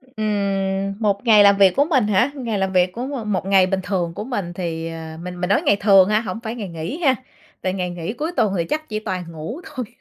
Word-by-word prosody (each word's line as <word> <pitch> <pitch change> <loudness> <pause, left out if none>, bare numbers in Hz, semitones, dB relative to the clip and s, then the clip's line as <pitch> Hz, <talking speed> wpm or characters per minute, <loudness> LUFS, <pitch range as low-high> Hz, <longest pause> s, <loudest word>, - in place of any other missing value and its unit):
Ừm, 195 -5 -2
một 205 0 0
ngày 215 -3 +7
làm 200 0 +6
việc 195 -2 +6
của 285 - +4
mình 270 -9 +2
hả? 225 +7 +2
Ngày 235 -7 -3
làm 190 0 -1
việc 180 0 +3
của 240 +6 -4 0.2
m 210 - -2
một 190 0 -1
ngày 195 -1 +5
bình 190 0 -1
thường 175 -3 -2
của 210 - -5
mình 205 -8 -4
thì 165 -2 -4
ờ, 160 -1 -7
mình 180 0 -7
mình 180 - -1
nói 200 - +3
ngày 200 - +3
thường 195 -2 +6
ha, 215 +1 +2
hổng 205 -1 -5
phải 225 0 -4
ngày 210 -6 -6
nghỉ 165 - -5
ha, 265 - +5 0.5
tại 185 - 0
ngày 180 -2 -2
nghỉ 175 +2 -5
cuối 305 +8 -4
tuần 200 -2 +2
thì 170 - 0
chắc 310 - -3
chỉ 215 - -2
toàn 185 -4 -4
ngủ 165 - -6
thôi. 255 -6 -6
195 Hz, 260 wpm, -21 LUFS, 180-220 Hz, 0.5 s, ngày